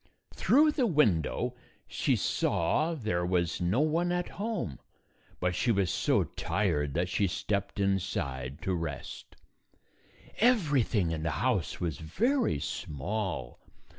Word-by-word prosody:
Through 305 +4 +4
the 260 -5 +1
window 125 - +2 0.3
she - - +1
saw 155 - +1
there 105 - -1
was 90 -1 0
no 95 +10 +2
one 165 +3 +1
at 180 0 -1
home, 205 - -3 0.6
but 90 0 0
she 115 +7 +1
was 100 -6 +1
so - - +2
tired 75 -1 -1
that 90 +2 +1
she 100 +2 +1
stepped 100 +3 -2
inside 75 -9 -1
to 95 - 0
rest. 80 -5 -5 1.0
Everything 145 - +3
in 80 -1 -2
the 80 - -1 0.2
house 110 -10 0
was 85 -5 -2
very 230 - +1
small. 75 - -4
95 Hz, 125 wpm, -30 LUFS, -, 1.0 s, Through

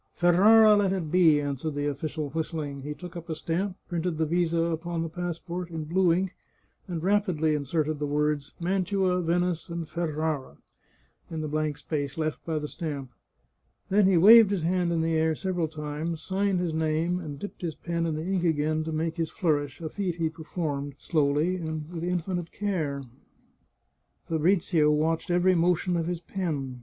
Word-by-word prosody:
Ferrara 210 +5 +6
let 200 -2 +2
it 175 -6 -2
be," 165 -5 +5
answered 145 +1 -3
the 145 0 -1
official, 145 0 -3
whistling; 155 -3 -3
he 150 +2 -5
took 175 +3 -10
up 170 0 -8
a 160 - -2
stamp, 180 +5 -2
printed 170 -1 -2
the 160 - +1
visa 170 +1 +1
upon 165 0 -1
the 165 - -4
passport 175 +1 -4
in 160 -2 -4
blue 175 +3 +2
ink, 185 +2 0 0.5
and 170 -3 -4
rapidly 185 -6 +2
inserted 150 +1 -1
the 145 - -1
words 145 -1 -1
" - - -34
Mantua, 185 0 +1
Venice, 175 0 0
and 170 -1 -4
Ferrara 155 -3 -2 0.4
" - - -37
in 160 -1 -4
the 155 - -3
blank 150 -1 -1
space 145 -3 -3
left 155 -1 -2
by 160 -1 0
the 150 0 -3
stamp. 145 -6 -5 0.8
Then 200 0 +4
he 190 -2 +4
waved 220 +4 +9
his 195 -5 -1
hand 175 0 +1
in 165 -1 +1
the 165 0 0
air 160 0 +2
several 180 -2 -1
times, 155 +1 -4
signed 195 -1 0
his 175 -3 -1
name, 160 +3 0
and 150 -5 -6
dipped 205 +6 -8
his 170 -3 -3
pen 170 -1 -2
in 160 - -1
the 155 +1 -4
ink 190 -1 0
again 155 -1 +1
to 160 - -3
make 160 +2 -2
his 165 -1 -1
flourish, 150 -6 -1
a 160 - -4
feat 185 -1 -2
he 165 -2 0
performed 155 -4 -4
slowly 155 +3 +1
and 160 -3 -4
with 170 -2 -5
infinite 175 -1 -2
care. 160 -9 -2 1.2
Fabrizio 165 -1 +2
watched 160 +4 +1
every 180 +1 +4
motion 175 +1 +2
of 165 -1 -1
his 175 -1 -3
pen. 150 -9 -3
165 Hz, 185 wpm, -27 LUFS, 155-180 Hz, 1.2 s, waved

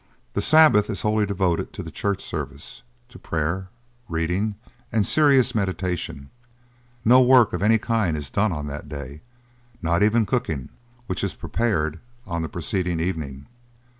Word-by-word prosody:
The - - 0
Sabbath 155 -10 +5
is 105 - -3
wholly 105 -1 +2
devoted 95 -4 -1
to - - -6
the - - -8
church 100 -1 -2
service, 75 -2 -6 0.3
to 125 - -14
prayer, 85 +4 -2 0.4
reading, 90 +6 -1 0.4
and 110 -3 +2
serious 135 -5 +4
meditation; 90 - -3 0.7
no 125 +3 +7
work 125 -3 +5
of - - -2
any 110 +2 +4
kind 110 -8 0
is 70 -3 -6
done 100 0 +1
on 75 -3 -4
that 75 +1 -7
day, 70 0 -8 0.6
not 85 +2 0
even 110 +2 +3
cooking, 90 - -2 0.4
which 95 -4 -3
is - - -2
prepared 85 -9 -1 0.3
on 85 -4 -3
the 80 - -3
preceding 90 0 -2
evening. 75 -6 -3
95 Hz, 150 wpm, -23 LUFS, 80-110 Hz, 0.7 s, no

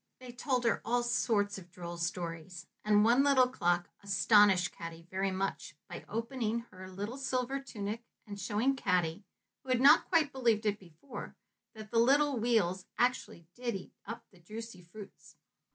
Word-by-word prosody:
They 255 -1 -9
told 250 0 -1
her 230 - +1
all 240 +1 +1
sorts 210 -4 +1
of 175 -2 -15
droll 175 -1 -7
stories, 170 0 -4 0.2
and 210 0 +4
one 240 +4 +5
little 270 -3 +5
clock 175 -7 0
astonished 200 -2 +4
Caddy 165 0 -8
very 190 +1 0
much 190 -4 -3
by 175 - -8
opening 230 0 -2
her 185 0 -10
little 205 +8 -5
silver 265 0 -1
tunic 220 -4 -5 0.2
and 205 -2 -8
showing 210 +8 +1
Caddy 180 -5 0 0.4
who 265 - -14
had 255 -1 +3
not 275 +2 +6
quite 320 -5 +3
believed 235 -5 +1
it 210 0 0
before 175 - -10 0.4
that 215 -1 -10
the 230 - +3
little 275 +2 +4
wheels 205 -6 +1
actually 245 -8 0
did 240 -2 -3
eat 190 - -8
up 230 +2 -8
the 185 - -20
juicy 220 +3 -9
fruits. 195 +4 -13
210 Hz, 165 wpm, -32 LUFS, 185-245 Hz, 0.4 s, not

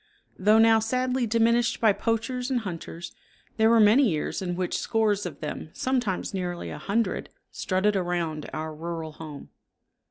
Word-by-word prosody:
Though 210 +3 +5
now 225 0 +6
sadly 255 +2 0
diminished 230 +2 +2
by 220 -3 +4
poachers 230 +4 -2
and 255 -3 0
hunters, 170 -3 -7 0.5
there 220 0 +4
were 230 0 +5
many 220 +4 +6
years 155 +2 -2
in 175 -2 -2
which 180 0 -2
scores 210 -4 +1
of 150 -5 -10
them, 155 0 -5
sometimes 245 -8 -1
nearly 180 -2 -4
a - - -7
hundred, 205 -1 -1 0.2
strutted 195 +3 0
around 175 -4 -2
our 155 0 -4
rural 165 0 -5
home. 150 -2 -10
205 Hz, 155 wpm, -26 LUFS, 175-230 Hz, 0.5 s, now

